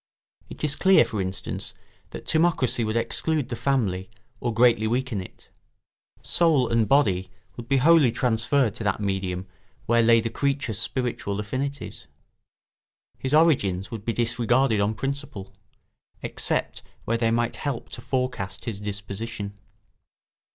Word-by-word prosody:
It -, -, -9 dB
is 145 Hz, -2 st, +2 dB
clear, 190 Hz, -7 st, +5 dB
for 110 Hz, -3 st, -3 dB
instance, 95 Hz, 0 st, -4 dB, 0.3 s
that -, -, -9 dB
timocracy 160 Hz, -8 st, +2 dB
would 110 Hz, +1 st, -1 dB
exclude 150 Hz, +4 st, 0 dB
the 120 Hz, -, -3 dB
family 105 Hz, -9 st, -1 dB, 0.3 s
or 120 Hz, -, -1 dB
greatly 115 Hz, -1 st, +4 dB
weaken 120 Hz, -3 st, -1 dB
it. 90 Hz, -, -13 dB, 0.7 s
Soul 160 Hz, -7 st, +3 dB
and 115 Hz, -2 st, +2 dB
body 95 Hz, -9 st, +2 dB, 0.3 s
would 120 Hz, -1 st, -8 dB
be 135 Hz, -, +4 dB
wholly 150 Hz, -2 st, +5 dB
transferred 120 Hz, 0 st, +1 dB
to 115 Hz, -, -5 dB
that 100 Hz, -1 st, 0 dB
medium 95 Hz, -2 st, -2 dB, 0.4 s
where 115 Hz, 0 st, +3 dB
lay 115 Hz, 0 st, +5 dB
the 115 Hz, 0 st, -3 dB
creature's 135 Hz, -6 st, -1 dB
spiritual 115 Hz, -4 st, -1 dB
affinities; 135 Hz, +7 st, -4 dB, 1.1 s
his 135 Hz, +3 st, 0 dB
origins 105 Hz, -, +2 dB
would 110 Hz, -3 st, -6 dB
be 115 Hz, -, -1 dB
disregarded 120 Hz, 0 st, +1 dB
on 105 Hz, +2 st, 0 dB
principle, 135 Hz, -6 st, -5 dB, 0.7 s
except -, -, -2 dB, 0.2 s
where 115 Hz, -, +1 dB
they 115 Hz, -1 st, +2 dB
might 120 Hz, +1 st, 0 dB
help 140 Hz, -5 st, -3 dB
to -, -, -6 dB
forecast 125 Hz, -7 st, -3 dB
his 110 Hz, -5 st, -4 dB
disposition. 105 Hz, +1 st, -5 dB
115 Hz, 135 wpm, -25 LUFS, 105-135 Hz, 1.1 s, clear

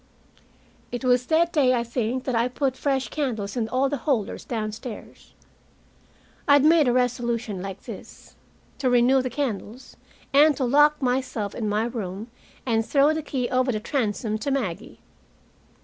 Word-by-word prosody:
It 245 Hz, +1 st, -4 dB
was 250 Hz, 0 st, +3 dB
that 335 Hz, +2 st, +2 dB
day, 260 Hz, -5 st, +4 dB
I 235 Hz, -, 0 dB
think, 240 Hz, +1 st, -2 dB
that 255 Hz, -, -2 dB
I 235 Hz, +1 st, +2 dB
put 260 Hz, +1 st, -1 dB
fresh 270 Hz, -1 st, -1 dB
candles 225 Hz, -9 st, -3 dB
in 225 Hz, -3 st, -1 dB
all 260 Hz, +3 st, +1 dB
the 285 Hz, +1 st, -2 dB
holders 235 Hz, -5 st, -1 dB
downstairs. 220 Hz, 0 st, -6 dB, 1.1 s
I 285 Hz, -, +6 dB
had 285 Hz, 0 st, +5 dB
made 315 Hz, -3 st, +5 dB
a -, -, +4 dB
resolution 240 Hz, -4 st, -1 dB
like 195 Hz, 0 st, -7 dB
this, -, -, -11 dB, 0.5 s
to 260 Hz, -, +1 dB
renew 245 Hz, +2 st, +4 dB
the 255 Hz, -, -3 dB
candles, 245 Hz, -2 st, -5 dB, 0.4 s
and 295 Hz, +1 st, +5 dB
to 270 Hz, -, -1 dB
lock 295 Hz, +4 st, +4 dB
myself 250 Hz, -5 st, -1 dB
in 215 Hz, -3 st, -3 dB
my 210 Hz, +1 st, +1 dB
room 220 Hz, -2 st, -5 dB, 0.3 s
and 225 Hz, -3 st, +1 dB
throw 285 Hz, +5 st, +3 dB
the 315 Hz, -, -2 dB
key 265 Hz, -4 st, -2 dB
over 255 Hz, 0 st, +1 dB
the 215 Hz, -, -2 dB
transom 215 Hz, -3 st, -2 dB
to 280 Hz, -, -3 dB
Maggie. 220 Hz, -8 st, -3 dB
250 Hz, 165 wpm, -24 LUFS, 225-275 Hz, 1.1 s, I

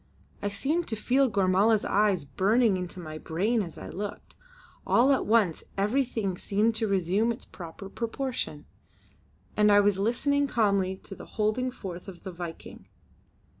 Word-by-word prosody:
I 205 Hz, -, -1 dB
seemed 290 Hz, +12 st, -1 dB
to 225 Hz, -, -1 dB
feel 255 Hz, +5 st, +2 dB
Gormala's 200 Hz, +2 st, +3 dB
eyes 200 Hz, -6 st, +2 dB
burning 210 Hz, -, +2 dB
into 180 Hz, 0 st, -5 dB
my 155 Hz, -2 st, -7 dB
brain 205 Hz, +10 st, 0 dB
as 170 Hz, -5 st, -6 dB
I -, -, -8 dB
looked. 205 Hz, +2 st, -6 dB, 0.5 s
All 255 Hz, +4 st, +5 dB
at 270 Hz, -, +1 dB
once 210 Hz, -7 st, +2 dB
everything 210 Hz, -3 st, 0 dB
seemed 215 Hz, +3 st, +1 dB
to 220 Hz, -, 0 dB
resume 195 Hz, +4 st, +1 dB
its 230 Hz, -, -6 dB
proper 175 Hz, +1 st, -9 dB
proportion, 230 Hz, -, -4 dB, 0.9 s
and 210 Hz, 0 st, +4 dB
I 205 Hz, -, +7 dB
was 205 Hz, -1 st, +3 dB
listening 280 Hz, +7 st, +1 dB
calmly 200 Hz, -6 st, +1 dB
to -, -, -8 dB
the -, -, -11 dB
holding 215 Hz, +4 st, +1 dB
forth 185 Hz, -8 st, -8 dB
of 185 Hz, -3 st, -10 dB
the 190 Hz, -, -6 dB
Viking. 170 Hz, -2 st, -8 dB
205 Hz, 155 wpm, -28 LUFS, 185-230 Hz, 0.9 s, I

